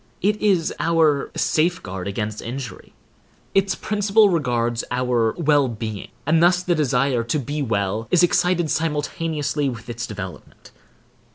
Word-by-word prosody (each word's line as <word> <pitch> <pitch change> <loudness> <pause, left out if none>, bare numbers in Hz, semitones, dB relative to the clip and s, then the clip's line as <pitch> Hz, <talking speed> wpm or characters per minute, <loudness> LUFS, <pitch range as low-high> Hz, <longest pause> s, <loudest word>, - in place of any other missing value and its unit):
It 210 +2 +1
is 190 -6 +2
our 160 -4 +2
safeguard 155 - 0
against 105 +1 -3
injury. 125 +1 -7 0.6
Its 195 0 +2
principle 210 0 +3
regards 120 -8 0
our 125 -3 +1
well 145 -4 +3
being; 110 -3 -5 0.2
and 160 +2 +3
thus 175 +1 +4
the 180 - +1
desire 135 -5 +1
to 135 - 0
be 145 +2 -3
well 110 -2 -1
is 180 -1 +4
excited 175 -2 +2
simultaneously 150 -2 -1
with 115 -3 -8
its 120 0 -5
development. 95 -4 -9
145 Hz, 130 wpm, -22 LUFS, 115-170 Hz, 0.6 s, thus